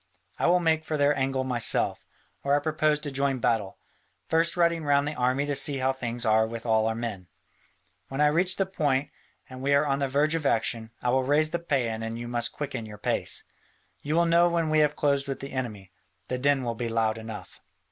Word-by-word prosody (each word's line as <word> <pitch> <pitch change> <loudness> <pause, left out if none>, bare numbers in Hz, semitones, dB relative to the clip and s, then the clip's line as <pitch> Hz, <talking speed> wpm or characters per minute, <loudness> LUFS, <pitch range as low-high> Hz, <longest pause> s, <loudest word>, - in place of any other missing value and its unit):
I - - +2
will 180 +1 +4
make 160 -2 +1
for 155 -1 -2
their 145 0 +3
angle 130 0 0
myself, 125 -3 0 0.3
where 140 +1 +2
I - - +3
propose 155 0 +1
to 145 -2 -4
join 135 0 0
battle, 110 -5 0 0.5
first 165 +2 +1
riding 170 -1 +2
round 145 0 +2
the 150 - -2
army 130 +1 0
to 145 - -1
see 140 +1 +3
how 130 0 +1
things 120 -2 -3
are 110 0 +3
with 115 +1 -7
all 110 -1 +2
our 110 - -1
men. 110 -6 -5 0.8
When 135 - -6
I 150 - +5
reach 175 +5 +2
the 195 - 0
point, 145 -7 -1 0.4
and 130 0 -10
we 140 +1 +2
are 140 +2 +3
on 140 -1 0
the 140 - 0
verge 145 +4 +1
of 165 -1 -1
action, 115 -1 0
I 125 - +2
will 130 +1 +3
raise 150 +4 +2
the 170 - -1
paean 140 -7 0 0.2
and 115 0 -4
then - - -6
you 120 0 -6
must 120 -1 0
quicken 130 -6 -5
your 105 -1 -10
pace. - - -2 0.6
You 150 +2 -2
will 170 0 +4
know 170 +1 +4
when 165 -2 0
we 155 - +4
have 150 0 +3
closed 140 -1 +1
with 135 - -4
the 135 - -7
enemy, 110 -8 -5 0.4
the 125 - -2
din 140 0 +2
will 120 -1 -2
be 115 +1 -4
loud 115 -1 0
enough. 110 -1 -9
135 Hz, 230 wpm, -27 LUFS, 120-150 Hz, 0.8 s, I